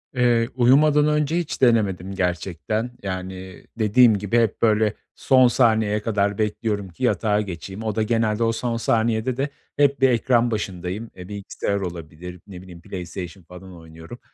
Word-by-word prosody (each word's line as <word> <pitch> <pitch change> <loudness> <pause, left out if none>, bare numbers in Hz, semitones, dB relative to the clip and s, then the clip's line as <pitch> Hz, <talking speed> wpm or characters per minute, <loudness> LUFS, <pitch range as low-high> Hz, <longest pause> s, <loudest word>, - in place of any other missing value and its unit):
Eee, 120 -2 +2
uyumadan 145 +4 +4
önce 150 +1 +1
hiç 170 -3 -4
denemedim 100 -7 +2
gerçekten. 90 +5 -2
Yani, 95 -1 -6 0.2
dediğim 110 +1 +5
gibi 105 +3 -1
hep 115 -4 +1
böyle 110 -2 +3 0.2
son 130 -1 +4
saniyeye 110 -3 +2
kadar 100 -2 0
bekliyorum 105 -2 -2
ki 90 +9 -10
yatağa 105 -4 +1
geçeyim. 95 +2 -7
O 110 -2 -2
da 110 - +1
genelde, 110 0 0
o 115 - +2
son 115 +1 -2
saniyede 115 +2 0
de 140 +2 -1 0.3
hep 140 -1 +2
bir 135 - +5
ekran 120 0 +2
başındayım. 100 +1 -4
Eee, 90 -1 -10
bilgisayar 100 0 -3
olabilir, 90 -1 -7
ne 90 -3 -10
bileyim, 90 -2 -13
PlayStation 90 0 -7
falan 90 +2 -12
oynuyorum. 80 +7 -12
105 Hz, 155 wpm, -22 LUFS, 95-120 Hz, 0.3 s, dediğim